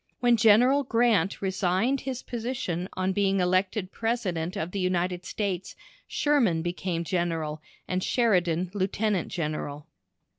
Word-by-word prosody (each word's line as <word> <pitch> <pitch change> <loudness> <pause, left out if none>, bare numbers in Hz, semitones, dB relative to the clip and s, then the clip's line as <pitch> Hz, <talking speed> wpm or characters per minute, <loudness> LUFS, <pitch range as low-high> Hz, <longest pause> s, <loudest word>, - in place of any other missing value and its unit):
When 245 -1 +4
General 235 +5 +5
Grant 225 -7 +2
resigned 190 +7 +1
his 260 -1 -5
position 225 -7 -3
on 185 0 -1
being 195 0 +2
elected 185 +2 +1
President 190 -8 -2
of 165 +3 -3
the 200 - -3
United 180 0 -1
States, 190 -3 -3 0.3
Sherman 235 - +2
became 175 0 -2
General, 165 -3 -2 0.3
and 185 0 -1
Sheridan 180 -7 +1
Lieutenant 200 -1 0
General. 150 -3 -4
185 Hz, 120 wpm, -27 LUFS, 175-225 Hz, 0.3 s, General